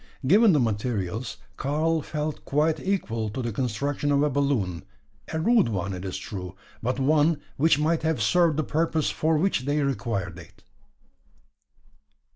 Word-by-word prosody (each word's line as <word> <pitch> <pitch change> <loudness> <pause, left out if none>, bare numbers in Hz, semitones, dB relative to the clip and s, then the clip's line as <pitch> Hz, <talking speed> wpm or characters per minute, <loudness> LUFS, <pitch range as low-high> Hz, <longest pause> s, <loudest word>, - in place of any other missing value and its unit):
Given 205 - +6
the 150 - +3
materials, 110 -1 -2 0.2
Karl 155 +3 0
felt 150 +1 -4
quite 155 +2 +1
equal 115 - -1
to 120 +5 -4
the 120 - -2
construction 135 +5 -1
of 140 0 +3
a 150 - +1
balloon 125 -11 0 0.5
a 160 - -1
rude 225 - +3
one, 100 -2 -2
it 90 0 -6
is 95 -1 -3
true; 95 -1 -7 0.3
but 125 +3 -1
one 150 +3 +3 0.2
which 160 +1 +4
might 160 +2 +1
have 160 -4 0
served 155 +9 +3
the 155 - +1
purpose 160 0 0
for 160 0 +1
which 155 -6 0
they 145 +1 +1
required 100 -9 -2
it. 95 +2 -16
140 Hz, 155 wpm, -26 LUFS, 110-155 Hz, 0.5 s, Given